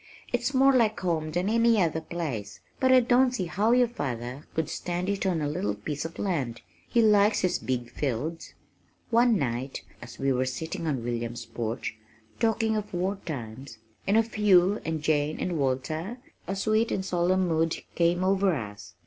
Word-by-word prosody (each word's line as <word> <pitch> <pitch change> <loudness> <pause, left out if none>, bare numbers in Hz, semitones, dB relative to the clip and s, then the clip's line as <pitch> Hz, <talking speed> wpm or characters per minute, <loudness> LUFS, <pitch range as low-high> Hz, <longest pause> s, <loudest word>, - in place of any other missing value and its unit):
"It's - - +1
more 270 +1 +6
like 230 -4 +3
home 165 -4 0
than 175 +4 -1
any 230 0 +4
other 160 -3 +1
place. 145 -12 -5 0.2
But 260 -1 +3
I 255 -1 +7
don't 250 +1 +3
see 185 - -1
how 205 +6 +1
your 245 0 +5
father 130 - -5
could 160 -2 0
stand 180 +1 -3
it 200 -1 -1
on 170 -5 0
a - - 0
little 175 +7 -1
piece 150 0 -4
of 165 - -7
land. 140 - -2 0.3
He 235 - +3
likes 210 0 +4
his 180 -1 +1
big 125 -2 -3
fields." 150 +5 -3 0.6
One 235 -1 +4
night 130 -1 -3 0.2
as 120 0 -10
we 135 0 +1
were 130 +1 0
sitting 160 +5 -4
on 135 -6 -1
William's 120 -1 -3
porch, 115 0 -4 0.4
talking 225 -1 +1
of 210 -1 -3
war 190 +3 -1
times 125 -4 -6 0.3
and 200 +3 +4
of 225 0 +1
Hugh 200 -1 +4
and 160 -2 -3
Jane 155 -1 +1
and 175 -4 -2
Walter, 155 - -2 0.3
a 195 - -2
sweet 215 +3 +1
and 190 - -1
solemn 185 +1 +1
mood 165 -1 +1 0.2
came 175 +1 +2
over 190 -1 +3
us. 100 -5 -7
170 Hz, 180 wpm, -27 LUFS, 135-205 Hz, 0.6 s, I